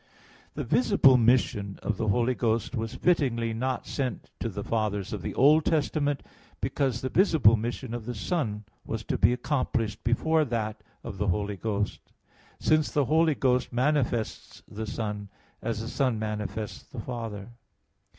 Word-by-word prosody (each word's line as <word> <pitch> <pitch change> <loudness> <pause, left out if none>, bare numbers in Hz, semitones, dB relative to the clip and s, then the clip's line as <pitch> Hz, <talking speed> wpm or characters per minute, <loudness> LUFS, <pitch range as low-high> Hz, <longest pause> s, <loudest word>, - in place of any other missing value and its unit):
The - - -2
visible 200 - +5
mission 110 -5 +2
of 105 - -1
the 110 - -1
Holy 120 +5 +2
Ghost 115 -1 0
was 115 +1 -3
fittingly 125 -10 +1
not 130 +3 -2
sent 130 -4 -3
to - - -2
the - - -5
fathers 105 -4 -1
of 105 - -4
the 85 - -5
Old 150 +4 +6
Testament, 145 -3 0 0.4
because 130 -4 -1
the 130 - -2
visible 160 - +5
mission 120 +2 -4
of 120 -2 -5
the 125 - -3
Son 110 - -2 0.2
was 110 -1 -4
to - - -1
be - - +5
accomplished 125 -4 -1
before 155 +7 +2
that 110 -5 -3 0.2
of 100 -5 -7
the 105 - 0
Holy 100 +2 0
Ghost; 105 0 -2 0.6
since 155 -1 +3
the 145 -2 +1
Holy 160 +2 +3
Ghost 125 -2 +1
manifests 125 -3 -1
the 110 +1 -6
Son, 105 -2 -4 0.3
as 110 -1 -2
the 115 - -5
Son 130 -2 0
manifests 105 0 -4
the 125 - -10
Father. 115 -3 -5
115 Hz, 160 wpm, -28 LUFS, 110-135 Hz, 0.6 s, Old